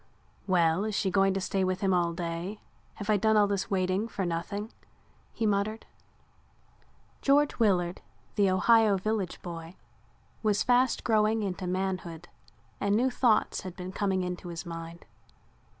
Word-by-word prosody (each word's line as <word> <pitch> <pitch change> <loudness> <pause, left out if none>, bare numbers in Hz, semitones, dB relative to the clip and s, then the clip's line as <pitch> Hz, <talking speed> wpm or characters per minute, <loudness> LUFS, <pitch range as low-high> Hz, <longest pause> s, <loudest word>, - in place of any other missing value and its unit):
"Well, 175 -1 +3
is 215 -1 -2
she 195 -3 0
going 195 0 +3
to - - 0
stay 195 0 -1
with 185 0 -1
him 195 -2 +2
all 175 -1 +2
day? 170 +4 -4 0.4
Have 205 - -7
I 215 -1 +3
done 220 +2 +3
all 210 - +6
this 200 -1 -2
waiting 185 +2 0
for 200 -4 -3
nothing?" 200 +6 -3 0.6
he 225 - -2
muttered. 210 +2 0 1.4
George 285 0 +3
Willard, 180 -5 +2 0.3
the 200 -2 +3
Ohio 210 +2 +4
village 200 -1 -2
boy, 170 0 -7 0.7
was 210 -2 +2
fast 250 +1 +2
growing 215 -1 +2
into 185 -1 -3
manhood 180 -2 -3 0.5
and 200 0 +1
new 255 +4 +2
thoughts 240 -3 +2
had 185 -2 -8
been 180 0 -6
coming 190 -1 0
into 180 0 -5
his 170 -2 -6
mind. 165 0 -8
195 Hz, 150 wpm, -29 LUFS, 180-215 Hz, 1.4 s, all